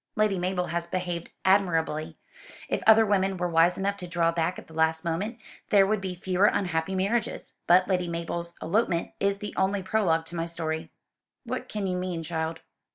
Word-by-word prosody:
"Lady 215 -3 +2
Mabel 180 0 -1
has 170 +1 -3
behaved 175 -1 -3 0.2
admirably. 165 -5 +2 0.5
If - - -1
other 220 0 +8
women 195 -2 +1
were 180 0 0
wise 170 +1 +3
enough 200 +1 -1
to 180 -2 -7
draw 170 -1 +2
back 165 +1 -1
at - - -9
the 160 - -16
last 160 0 +1
moment 195 +8 -2 0.3
there 200 -2 +6
would 210 0 0
be 185 -2 -4
fewer 185 +2 +1
unhappy 180 -1 0
marriages. 200 +5 -1
But 180 +2 +6
Lady 180 -2 0
Mabel's 170 0 -4
elopement 175 -2 0
is 200 0 +1 0.2
only 190 +1 +1
the 190 - -12
prologue 170 -7 +2
to 170 - -6
my 165 0 -2
story." 160 -1 -3 0.5
"What - - -5
can 210 -2 -3
you 180 -1 -1
mean, 180 -2 -3
child?" 160 0 -3
180 Hz, 185 wpm, -27 LUFS, 165-195 Hz, 0.5 s, other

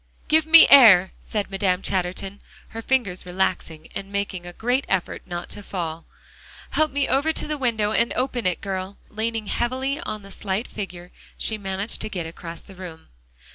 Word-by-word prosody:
"Give 315 0 +3
me 325 +1 +10
air," 200 -9 +9
said 205 -2 -3
Madame 190 -1 0
Chatterton, 190 +1 -3 0.3
her 225 - -7
fingers 225 -8 0
relaxing, 180 -3 -2
and 195 0 -6
making 195 -3 -3
a 175 - -8
great 245 +7 0
effort 190 -2 -1
not 175 0 -5
to - - -6
fall. 170 -4 -5 0.6
"Help 310 0 +2
me 280 0 0
over 280 +5 +2
to - - -2
the 305 - -1
window, 225 -6 0
and 235 +2 +2
open 250 -5 -1
it, 180 - -1
girl" 190 0 -4
and 215 - -22
leaning 225 -1 -1
heavily 260 +6 -1
on 215 - -5
the 195 - -13
slight 195 +3 -3
figure, 180 -4 -7 0.3
she 220 -1 -1
managed 195 +2 -3
to - - -3
get 180 -5 -4
across 165 0 -8
the 195 - -13
room. 180 -4 -10
200 Hz, 180 wpm, -23 LUFS, 185-240 Hz, 0.6 s, me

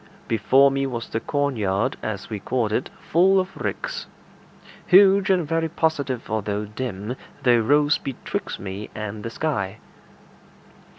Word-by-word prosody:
Before 130 +5 +4
me 135 0 0
was 120 -3 -5
the 110 - -1
cornyard, 115 -9 0
as 100 -3 -4
we 105 -2 -5
called 115 +1 -1
it, 125 - -1
full 190 +4 +4
of 185 +1 -3
ricks. - - -4 0.8
Huge 195 +1 +6
and 180 -5 +2
very 165 +1 0
positive 145 -7 -1
although 105 -1 -2
dim, 105 0 -5 0.3
they 120 -2 +5
rose 145 +6 +3
betwixt 135 -3 -5
me 100 +2 -6
and 105 -1 -5
the 115 - -3
sky. 110 -9 -2
125 Hz, 135 wpm, -23 LUFS, 105-150 Hz, 0.8 s, Huge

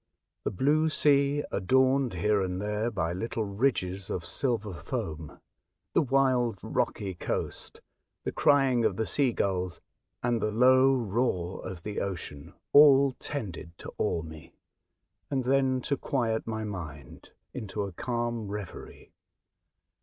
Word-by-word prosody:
The - - +2
blue 150 - +2
sea 145 -1 +3
adorned 130 +3 +2
here 105 +3 +2
and 90 -1 -2
there 105 +3 -1
by 85 -7 -2
little 110 +4 -2
ridges 100 -3 -1
of 85 -3 -3
silver 110 -2 -1
foam, 80 -2 -5 0.5
the - - +4
wild 130 -5 +2
rocky 95 -2 -1
coast, 85 - -4 0.4
the - - -2
crying 135 -4 +3
of 105 -4 +1
the 110 - 0
sea 135 0 +2
gulls, 95 -5 -1 0.4
and 120 -2 +1
the 105 - +1
low 130 +4 +5
roar 105 -6 -1
of 90 -2 -7
the 105 -1 -3
ocean, 80 -7 -6 0.2
all 140 -2 +8
tended 90 - -6
to - - -9
awe 80 - 0
me, 80 -1 -11 0.7
and 130 -2 0
then 130 0 +2
to 140 +2 -1
quiet 115 -6 -1
my 110 -1 -3
mind 80 -10 -8 0.2
into 105 -1 -4
a 100 - -5
calm 120 +2 -3
reverie. 100 -3 -8
110 Hz, 135 wpm, -28 LUFS, 95-130 Hz, 0.7 s, all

